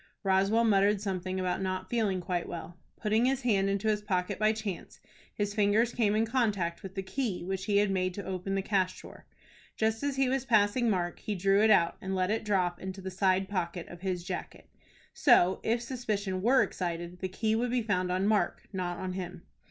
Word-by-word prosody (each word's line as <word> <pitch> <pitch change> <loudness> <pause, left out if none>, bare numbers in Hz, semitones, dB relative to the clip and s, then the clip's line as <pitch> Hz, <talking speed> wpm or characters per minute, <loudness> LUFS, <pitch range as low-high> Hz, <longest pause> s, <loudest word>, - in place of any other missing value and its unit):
Roswell 195 +4 +3
muttered 205 -2 +3
something 185 -2 -3
about 185 0 -1
not 185 0 -2
feeling 205 -5 0
quite 175 -1 -2
well. 170 0 -7 0.2
Putting 220 +2 +2
his 265 0 0
hand 195 -5 +2
into 200 +2 -1
his 210 -1 +1
pocket 185 -3 -1
by 215 0 +4
chance, 215 -5 -6 0.4
his 205 -1 -1
fingers 215 +3 +2
came 215 -3 +2
in 220 +1 +2
contact 210 -8 0
with 190 -2 -9
the 195 - -3
key 205 -3 -3
which 190 +1 -3
he 205 -1 +2
had 205 -1 +3
made 185 -1 0
to 200 - -6
open 190 +1 -3
the 195 - -1
cash 190 -2 0
drawer. - - -13 0.5
Just 220 0 0
as 285 -1 -1
he 270 -1 +2
was 265 0 0
passing 230 0 +3
Mark, 175 -4 -1
he 210 -2 -3
drew 195 +2 +3
it 220 - +5
out 170 -5 +4
and 190 0 -3
let 185 +1 +1
it 220 +1 -1
drop 185 -4 0
into 190 +1 -6
the 190 0 -6
side 190 0 +2
pocket 180 -3 -3
of 175 -1 -11
his 185 -2 -2
jacket. - - -6 0.5
So, 190 - +4
if 235 +2 0
suspicion 210 -7 -3
were 255 +6 +5
excited, 175 0 -4
the 185 - -3
key 220 +4 0
would 240 +2 0
be 245 -1 0
found 185 -4 0
on 185 +2 0
Mark, 210 0 +1
not 180 -2 -2
on 185 -1 -4
him. 180 -1 -6
195 Hz, 210 wpm, -30 LUFS, 185-220 Hz, 0.5 s, it